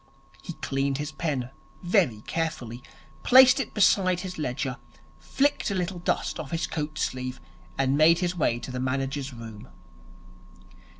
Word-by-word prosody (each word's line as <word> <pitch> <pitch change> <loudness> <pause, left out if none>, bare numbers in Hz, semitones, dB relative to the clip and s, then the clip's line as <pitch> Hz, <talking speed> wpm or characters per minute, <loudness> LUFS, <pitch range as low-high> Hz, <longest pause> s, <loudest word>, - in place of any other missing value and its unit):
He - - -7
cleaned 135 0 -2
his 150 +1 -4
pen 140 -7 -3 0.3
very 175 - +2
carefully, 130 -8 -3 0.4
placed 255 - +7
it 260 - -4
beside 185 -3 +3
his 185 -3 -6
ledger, 130 -1 -2 0.4
flicked 285 -2 0
a 200 - -2
little 180 0 -2
dust 175 - -1
off 150 -4 -6
his 165 0 -1
coatsleeve, 150 -5 -3 0.4
and 135 0 +2
made 160 +3 +6
his 180 0 -1
way 135 -8 +1
to - - -7
the 125 - -4
manager's 135 +2 -2
room. 115 -3 -10
150 Hz, 140 wpm, -26 LUFS, 130-180 Hz, 0.4 s, placed